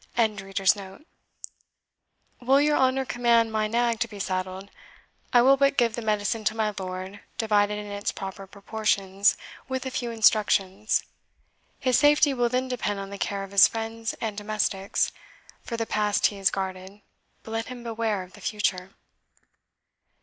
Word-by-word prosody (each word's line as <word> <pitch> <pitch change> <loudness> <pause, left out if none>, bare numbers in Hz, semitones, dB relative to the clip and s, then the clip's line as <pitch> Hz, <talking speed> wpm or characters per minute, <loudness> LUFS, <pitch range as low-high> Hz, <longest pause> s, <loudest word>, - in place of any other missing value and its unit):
] - - -26 2.3
Will 265 +3 +4
your 295 +1 +3
honour 265 0 +2
command 235 -2 +2
my 215 -1 0
nag 235 0 +1
to 235 - 0
be 210 -2 -11
saddled? 190 0 -4 0.6
I 240 -2 +6
will 270 +2 +6
but 275 0 +2
give 235 -3 +3
the 235 - -4
medicine 215 0 -1
to 215 - +1
my 215 -1 0
lord, 185 +1 -6 0.2
divided 210 -2 +2
in 210 - -6
its 205 0 -3
proper 195 0 -7
proportions, 200 -1 0 0.3
with 260 0 -3
a 260 - -3
few 245 -2 -3
instructions. 210 -2 +2 0.8
His 255 -3 +3
safety 295 -1 +5
will 245 -2 +1
then 255 +1 0
depend 220 -5 -2
on 195 0 -7
the 200 - -7
care 200 -1 -2
of 195 - -9
his 200 -1 +8
friends 225 0 -4
and 220 -2 -3
domestics; 205 -2 -1 0.5
for 230 - -5
the 225 - -1
past 210 -2 +1
he 205 - +1
is 195 - +3
guarded, 190 +1 -5 0.4
but 220 - -10
let 225 0 -2
him 250 -1 -8
beware 225 -4 -2
of 180 - -16
the - - -14
future." 195 -3 -2
215 Hz, 160 wpm, -26 LUFS, 200-235 Hz, 2.3 s, his